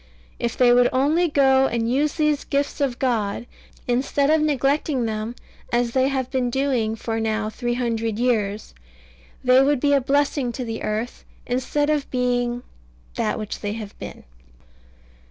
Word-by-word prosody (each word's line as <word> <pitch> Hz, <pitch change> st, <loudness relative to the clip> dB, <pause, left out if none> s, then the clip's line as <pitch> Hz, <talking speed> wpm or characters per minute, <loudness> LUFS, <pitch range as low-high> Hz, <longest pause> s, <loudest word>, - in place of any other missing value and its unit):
If 235 Hz, -, -2 dB
they 245 Hz, -1 st, +5 dB
would 245 Hz, 0 st, +5 dB
only 300 Hz, +7 st, +2 dB
go 270 Hz, -2 st, +4 dB
and 230 Hz, -2 st, -1 dB
use 285 Hz, +5 st, +1 dB
these 300 Hz, -2 st, +1 dB
gifts 285 Hz, 0 st, -2 dB
of 260 Hz, -4 st, 0 dB
God, 230 Hz, -4 st, -1 dB, 0.4 s
instead 275 Hz, +4 st, +1 dB
of 315 Hz, 0 st, +4 dB
neglecting 280 Hz, -2 st, +1 dB
them 220 Hz, +1 st, -3 dB, 0.4 s
as 240 Hz, 0 st, +1 dB
they 260 Hz, +1 st, +2 dB
have 265 Hz, -2 st, -2 dB
been 255 Hz, -2 st, 0 dB
doing 245 Hz, -4 st, 0 dB
for 225 Hz, 0 st, -3 dB
now 220 Hz, -1 st, -1 dB
three 240 Hz, +1 st, -2 dB
hundred 230 Hz, -3 st, -1 dB
years, 220 Hz, -4 st, -1 dB, 0.7 s
they 255 Hz, +1 st, +6 dB
would 280 Hz, 0 st, +2 dB
be 285 Hz, +2 st, +2 dB
a 280 Hz, -, +4 dB
blessing 275 Hz, -1 st, +1 dB
to 255 Hz, -, -4 dB
the 225 Hz, -1 st, -5 dB
earth, 220 Hz, +3 st, -3 dB, 0.2 s
instead 275 Hz, +4 st, 0 dB
of 295 Hz, -2 st, -1 dB
being 245 Hz, -1 st, 0 dB, 0.5 s
that -, -, -1 dB
which 215 Hz, -1 st, -5 dB
they 205 Hz, -1 st, -3 dB
have 215 Hz, -2 st, -7 dB
been. -, -, -8 dB
250 Hz, 160 wpm, -23 LUFS, 230-275 Hz, 0.7 s, they